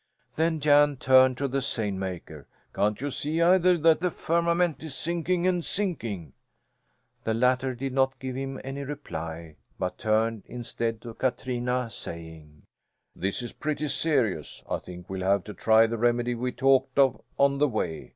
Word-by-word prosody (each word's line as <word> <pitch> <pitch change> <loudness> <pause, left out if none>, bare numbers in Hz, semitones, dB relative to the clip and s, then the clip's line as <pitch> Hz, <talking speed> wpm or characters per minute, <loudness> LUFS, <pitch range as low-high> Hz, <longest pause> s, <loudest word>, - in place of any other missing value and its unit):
Then 160 0 +1
Jan 145 -1 +4
turned 130 -1 +5
to 140 - -1
the 135 +1 -1
seine 110 -6 -1
maker. 85 -6 -6 0.3
"Can't 105 +1 +1
you 145 0 -2
see 150 +5 -1
either 180 +1 +5
that 160 -1 +4
the 180 +1 +1
firmament 170 0 0
is 155 -4 -6
sinking 170 +3 -1
and 180 -2 +1
sinking?" 115 - -3 0.9
The 110 - 0
latter 125 +2 +2
did 135 +1 -4
not 135 0 +2
give 130 0 -5
him 135 0 -4
any 135 +1 -5
reply, 85 - -6 0.2
but 90 0 -3
turned 110 0 +1
instead 115 -2 -3
to 115 -2 -7
Katrina, 125 -1 -1
saying: 80 -5 -9 0.5
"This 100 +6 -2
is 120 - -6
pretty 150 -1 -2
serious. 130 - 0
I - - -1
think 90 0 -11
we'll 95 0 -5
have 95 0 +2
to 105 - -8
try 110 +1 +5
the 115 0 -3
remedy 120 +1 +2
we 125 +2 -2
talked 135 +1 +2
of 135 -3 +4 0.2
on 140 0 +3
the 150 - +4
way. 90 - -3
130 Hz, 165 wpm, -27 LUFS, 110-145 Hz, 0.9 s, turned